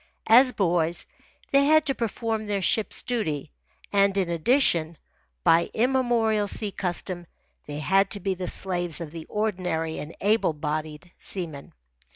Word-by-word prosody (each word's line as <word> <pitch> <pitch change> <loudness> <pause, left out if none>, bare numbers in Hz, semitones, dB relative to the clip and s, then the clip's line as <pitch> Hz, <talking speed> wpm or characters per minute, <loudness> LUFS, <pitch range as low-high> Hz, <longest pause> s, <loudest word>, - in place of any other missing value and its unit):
As 250 +3 +7
boys, 175 -5 0 0.5
they 275 0 +5
had 305 - +4
had 310 -1 +5
to 270 - +1
perform 225 -2 -3
their 200 -2 -1
ship's 215 +2 +1
duty, 155 - -3 0.4
and, 200 0 +3
in 185 -3 0
addition, 170 - +2 0.5
by 165 - +4
immemorial 235 -4 +1
sea 205 +1 +1
custom, 175 -1 -3 0.4
they 145 0 -5
had 175 +6 +1
had 195 0 +4
to 205 - -3
be 195 0 -1
the 185 -1 -5
slaves 175 -3 0
of 165 -3 -7
the 165 -1 -8
ordinary 180 -7 -2
and 150 - -8
able 200 -4 +2
bodied 155 +2 -5
seamen. 160 -7 -6
190 Hz, 155 wpm, -25 LUFS, 165-220 Hz, 0.5 s, As